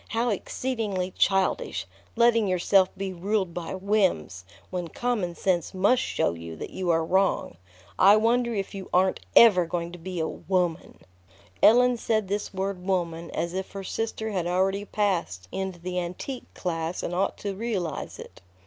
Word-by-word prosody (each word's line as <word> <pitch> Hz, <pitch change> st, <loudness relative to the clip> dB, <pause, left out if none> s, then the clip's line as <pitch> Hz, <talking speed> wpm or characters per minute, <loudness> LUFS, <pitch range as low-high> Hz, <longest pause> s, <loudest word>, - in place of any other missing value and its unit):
"How 230 Hz, +2 st, 0 dB
exceedingly 210 Hz, -3 st, -2 dB
childish, 195 Hz, -1 st, +1 dB, 0.3 s
letting 230 Hz, -2 st, +4 dB
yourself 185 Hz, +1 st, +3 dB
be 195 Hz, -1 st, -3 dB
ruled 190 Hz, 0 st, -1 dB
by 175 Hz, +1 st, -4 dB
whims, 185 Hz, -, 0 dB, 0.3 s
when 180 Hz, -2 st, -3 dB
common 205 Hz, -4 st, -2 dB
sense 180 Hz, -2 st, 0 dB
must 205 Hz, +7 st, +3 dB
show -, -, 0 dB
you 85 Hz, -1 st, -8 dB
that -, -, -7 dB
you 185 Hz, -2 st, -3 dB
are 165 Hz, -1 st, +2 dB
wrong. 190 Hz, -, +1 dB, 0.4 s
I 200 Hz, +2 st, +8 dB
wonder 235 Hz, +2 st, +2 dB
if 200 Hz, -3 st, -3 dB
you 195 Hz, -1 st, -7 dB
aren't 185 Hz, +1 st, +3 dB, 0.2 s
ever 185 Hz, -7 st, +7 dB
going 170 Hz, 0 st, -3 dB
to 175 Hz, -, -10 dB
be 180 Hz, +1 st, -5 dB
a 160 Hz, -, 0 dB
woman." 180 Hz, -3 st, -2 dB, 0.6 s
Ellen 245 Hz, +2 st, +6 dB
said 220 Hz, -3 st, 0 dB
this 205 Hz, +1 st, -2 dB
word 190 Hz, -1 st, -3 dB
"woman" 170 Hz, -3 st, -1 dB
as 170 Hz, +1 st, -3 dB
if 190 Hz, +1 st, -4 dB
her 195 Hz, -1 st, -5 dB
sister 220 Hz, +2 st, -3 dB
had 180 Hz, -4 st, -1 dB
already 190 Hz, +3 st, +1 dB
passed 170 Hz, -, -1 dB
into 190 Hz, -2 st, -3 dB
the 180 Hz, +1 st, -3 dB
antique 180 Hz, +9 st, -6 dB
class 165 Hz, -1 st, -3 dB
and 175 Hz, -, -3 dB
ought 185 Hz, +2 st, 0 dB
to 200 Hz, -1 st, -4 dB
realize 195 Hz, -6 st, -3 dB
it. -, -, -12 dB
190 Hz, 165 wpm, -26 LUFS, 175-210 Hz, 0.6 s, I